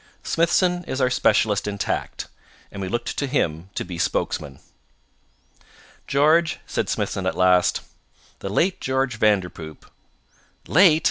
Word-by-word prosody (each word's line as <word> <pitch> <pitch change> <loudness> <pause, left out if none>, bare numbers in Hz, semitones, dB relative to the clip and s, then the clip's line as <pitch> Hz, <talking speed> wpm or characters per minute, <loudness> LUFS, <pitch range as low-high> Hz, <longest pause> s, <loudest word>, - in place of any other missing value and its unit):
Smithson 175 +1 +1
is 130 - -4
our 130 -1 +2
specialist 105 -4 +2
in 100 -1 -3
tact, 100 - -3 0.4
and 100 - -7
we 95 - -3
looked 120 +6 -3
to 140 - -1
him 85 - -1
to - - -3
be 85 -2 -7
spokesman. 70 -4 -2 1.5
"George," 155 +4 +3
said - - -2
Smithson 95 -1 -2
at - - -2
last, 90 -1 +3 0.6
"the 100 - -5
late 180 - +1
George 130 -3 -1
Vanderpoop 90 -7 -1 0.4
" - - -29
"Late!" 165 -2 +6
110 Hz, 135 wpm, -23 LUFS, 95-150 Hz, 1.5 s, Late